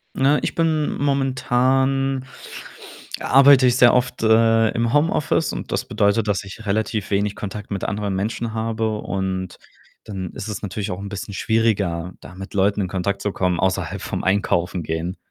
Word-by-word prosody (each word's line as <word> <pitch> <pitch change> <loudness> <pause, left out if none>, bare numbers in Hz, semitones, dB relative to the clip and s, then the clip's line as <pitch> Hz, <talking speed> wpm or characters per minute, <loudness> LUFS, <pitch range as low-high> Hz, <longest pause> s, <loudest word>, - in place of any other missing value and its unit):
Na, 140 +2 +3
ich - - -1
bin 160 -2 0
momentan 135 0 +1 0.9
arbeite 135 0 +6
ich 125 0 +2
sehr 120 -1 +6
oft, 125 0 0
äh, 115 0 +4
im 115 +1 -1
Homeoffice 155 +1 +1
und - - -6
das - - -1
bedeutet, 100 +2 +1
dass 105 -1 0
ich 100 +3 -10
relativ 110 0 -1
wenig 100 +1 0
Kontakt 105 0 -7
mit 100 - -3
anderen 100 -1 -2
Menschen 110 +3 -3
habe 110 -1 -2
und 95 -2 -3 0.5
dann 95 -4 -6
ist - - -6
es 105 - -5
natürlich 105 0 -4
auch 90 - -5
'n 100 - -6
bisschen 100 0 -6
schwieriger, 95 -6 0
da 90 - -12
mit 95 +1 -9
Leuten 100 +1 +2
in 95 - -1
Kontakt 100 +2 -2
zu 105 - 0
kommen 90 -2 -1
außerhalb 95 0 -1
vom - - -4
Einkaufen 90 -3 0
gehen. 80 +4 -3
105 Hz, 170 wpm, -21 LUFS, 95-125 Hz, 0.9 s, arbeite